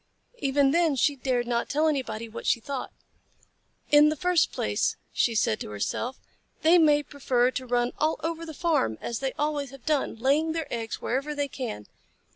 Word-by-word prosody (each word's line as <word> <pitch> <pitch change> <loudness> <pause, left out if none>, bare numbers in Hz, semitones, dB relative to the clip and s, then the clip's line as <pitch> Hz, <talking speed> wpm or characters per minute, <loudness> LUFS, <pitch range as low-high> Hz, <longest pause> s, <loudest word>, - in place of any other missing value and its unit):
Even 275 -1 +2
then 330 -2 +3
she 285 +2 +2
dared 250 -2 -1
not 235 -1 -1
tell 305 +2 +2
anybody 230 -7 -2
what 220 - -7
she - - +3
thought. 270 +3 -5 1.0
"In 295 +1 +7
the 310 - -1
first 360 +1 +2
place," - - 0 0.2
she 230 - +1
said 220 0 +1
to - - -6
herself, 230 - -3 0.5
"they 335 +3 +6
may 295 -2 +4
prefer 255 -3 +1
to 255 0 -5
run 245 0 +1
all 310 +1 +1
over 330 0 -2
the 320 -2 -8
farm, 295 - +1
as 235 - -4
they 270 -1 -2
always 295 -2 -2
have 275 -1 -14
done, 300 -6 0
laying 285 +7 +1
their 325 -1 -2
eggs 225 -1 -4
wherever 275 +4 -1
they 285 -1 -1
can. 245 - -6
275 Hz, 185 wpm, -27 LUFS, 240-305 Hz, 1.0 s, In